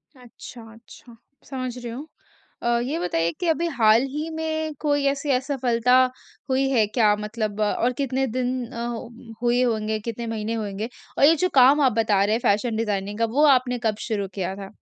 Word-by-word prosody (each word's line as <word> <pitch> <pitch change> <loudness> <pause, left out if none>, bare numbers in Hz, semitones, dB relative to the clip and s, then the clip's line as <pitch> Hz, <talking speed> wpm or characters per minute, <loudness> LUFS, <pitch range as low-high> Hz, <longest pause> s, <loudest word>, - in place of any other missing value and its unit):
अच्छा, 245 -1 -12
अच्छा। 230 +1 -16 0.3
समझ 255 -2 -4
रही 240 -1 -6
हूँ। 275 +7 -7 0.6
अ, 235 0 +2
ये 285 +6 -2
बताइए 170 -1 0
कि 355 - -2
अभी 330 +1 +1
हाल 230 -7 +4
ही 300 +4 -4
में 315 -1 -2
कोई 290 -2 0
ऐसी 275 +1 -1
असफलता 250 -2 +1 0.5
हुई 265 +1 +2
है 235 -5 +3
क्या 215 -2 +3
मतलब 210 0 -4
और 235 +4 +1
कितने 270 0 -1
दिन 250 +1 -2
अ, 235 0 -4 0.6
हुए 240 +1 +2
होंगे 220 -2 -1
कितने 230 +2 -5
महीने 225 0 -3
होंगे 215 0 -4 0.3
और - - +2
ये 320 +3 +6
जो 365 +3 0
काम 270 +3 +6
आप 265 - +4
बता 205 -3 +2
रहे 210 +2 +2
हैं - - -1
फ़ैशन 220 +3 +1
डिज़ाइनिंग 210 -2 -2
का 230 - +3
वो 300 - +6
आपने 250 -1 -3
कब 220 -2 +1
शुरू 205 -3 -1
किया 190 0 -2
था? 195 -1 -9
240 Hz, 185 wpm, -23 LUFS, 215-270 Hz, 0.6 s, ये